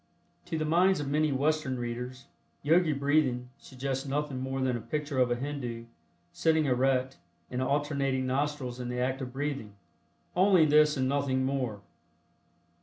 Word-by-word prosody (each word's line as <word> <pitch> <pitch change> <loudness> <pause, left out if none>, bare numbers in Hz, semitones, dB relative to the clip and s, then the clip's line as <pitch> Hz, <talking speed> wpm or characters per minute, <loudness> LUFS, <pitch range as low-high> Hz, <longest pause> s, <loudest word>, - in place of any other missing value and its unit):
To 170 -2 -3
the 155 - -1
minds 180 +4 +3
of 145 - -3
many 150 +2 +1
Western 140 -1 0
readers, 125 +2 -5 0.4
"Yogi 165 +2 +4
Breathing" 140 -3 +1
suggests 135 0 -4
nothing 140 -1 -2
more 130 +1 -3
than 130 -2 +1
a 120 - -4
picture 150 +2 -3
of 125 -1 +4
a 120 - +1
Hindu, 120 -3 -5 0.5
sitting 160 -1 +2
erect, 130 0 +1 0.3
and 125 0 -2
alternating 140 -1 0
nostrils 130 -1 -2
in 125 -1 -4
the 125 0 -3
act 130 +2 -1
of 130 -1 -5
breathing. 135 -6 -4 0.6
"Only 185 -2 +5
this 150 0 +4
and 130 0 +1
nothing 135 -1 0
more." 130 -7 -2
135 Hz, 155 wpm, -29 LUFS, 130-150 Hz, 0.6 s, Only